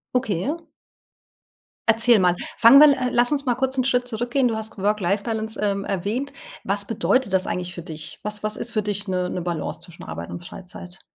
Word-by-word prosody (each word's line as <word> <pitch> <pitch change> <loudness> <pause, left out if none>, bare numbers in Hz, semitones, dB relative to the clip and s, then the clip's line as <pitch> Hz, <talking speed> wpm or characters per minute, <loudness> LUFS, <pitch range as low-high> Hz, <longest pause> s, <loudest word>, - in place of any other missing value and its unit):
Okay, 210 -9 0
erzähl 295 +4 -1
mal. 335 - -21 1.2
Erzähl 225 0 +5
mal. 180 -1 +3 0.2
Fangen 235 +5 +8
wir 295 -1 +8
äh, 255 - 0
lass 240 +2 +3
uns 285 -1 0
mal 245 -2 +2
kurz 265 +1 -1
'n 255 - +3
Schritt 250 -1 +1
zurückgehen. 245 +3 0
Du 230 - -1
hast 220 0 -5
Work 205 +2 0
Life 200 +3 0
Balance, 220 -1 -3
ähm, 200 -1 0
erwähnt. 205 +9 -2 0.3
Was 200 +1 0
bedeutet 225 0 +1
das 190 0 +2
eigentlich 180 -1 -3
für 170 - -7
dich? 160 -3 -6
Was 210 0 -3
was 215 0 -1
ist 235 - -4
für 215 - +1
dich 205 0 -3
'ne 180 -1 -1
'ne 180 - -3
Balance 170 -2 -3
zwischen 170 -2 -12
Arbeit 80 +2 -7
und 175 - -7
Freizeit? 185 0 -10
210 Hz, 215 wpm, -23 LUFS, 185-245 Hz, 1.2 s, Fangen